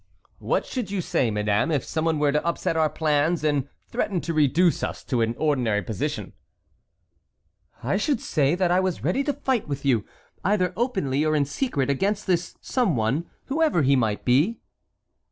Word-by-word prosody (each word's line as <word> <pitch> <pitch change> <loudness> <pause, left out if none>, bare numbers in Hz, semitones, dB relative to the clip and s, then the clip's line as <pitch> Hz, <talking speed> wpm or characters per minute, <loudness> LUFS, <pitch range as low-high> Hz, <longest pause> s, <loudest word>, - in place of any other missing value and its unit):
"What - - 0
should 245 -7 -4
you 200 -1 -2
say, 130 -8 0
madame, 105 +5 +1
if 145 -6 0
someone 160 0 0
were 145 -1 +2
to 150 +1 0
upset 170 -1 -1
our 160 -1 +3
plans 155 +2 +1
and 145 -3 0 0.2
threaten 205 -6 -1
to 170 - -3
reduce 155 +3 +3
us - - -4
to 125 -4 -1
an 115 +1 0
ordinary 125 -9 +1
position?" 105 0 -4 1.5
"I 140 +11 +1
should 230 +4 0
say 145 -4 +1
that 180 -1 +1
I 180 - +4
was 185 -2 -1
ready 185 - +1
to 290 - 0
fight 265 -4 -1
with 140 -1 -4
you, 120 -6 +3 0.4
either 185 -2 +1
openly 190 - 0
or 155 0 +1
in 145 -2 +2
secret, 140 - -1
against 200 +9 0
this 180 -2 0
someone, 155 - 0 0.2
whoever 295 - +2
he 140 +1 +4
might 110 -5 0
be." 150 - +3
155 Hz, 170 wpm, -25 LUFS, 135-190 Hz, 1.5 s, I